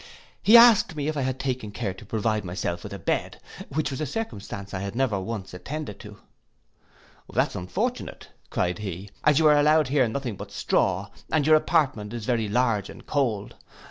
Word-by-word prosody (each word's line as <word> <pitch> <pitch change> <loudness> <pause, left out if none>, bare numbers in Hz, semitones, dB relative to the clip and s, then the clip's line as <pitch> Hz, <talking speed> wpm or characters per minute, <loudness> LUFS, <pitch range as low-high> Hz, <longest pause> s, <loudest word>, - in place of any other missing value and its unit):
He 225 +3 +8
asked 230 -7 +7
me 145 -1 -2
if 155 - -1
I 140 - -1
had 130 0 -2
taken 130 -5 -2
care 105 -2 -3
to 95 - -13
provide 110 -1 0
myself 90 -1 -3
with - - -8
a - - -5
bed, - - -2 0.3
which 155 +1 -1
was 135 - -4
a 155 - -1
circumstance 100 - -5
I 95 - -2
had 100 +2 -5
never 120 -6 +1
once 95 -1 -5
attended 135 +2 -6
to. 105 -2 -11 1.1
'That's - - +1
unfortunate,' 90 0 -3 0.2
cried 90 +3 -1
he, 100 -1 -6
'as 150 -2 +4
you 160 - +4
are 150 -1 +6
allowed 150 -1 +4
here 135 -3 +3
nothing 120 -3 -4
but - - -8
straw, - - 0 0.2
and 150 -2 +2
your 155 0 +7
apartment 135 -10 +1
is 115 -3 -5
very 115 -4 0
large 115 -3 +1
and - - -12
cold. 115 -8 -1
120 Hz, 190 wpm, -25 LUFS, 100-150 Hz, 1.1 s, He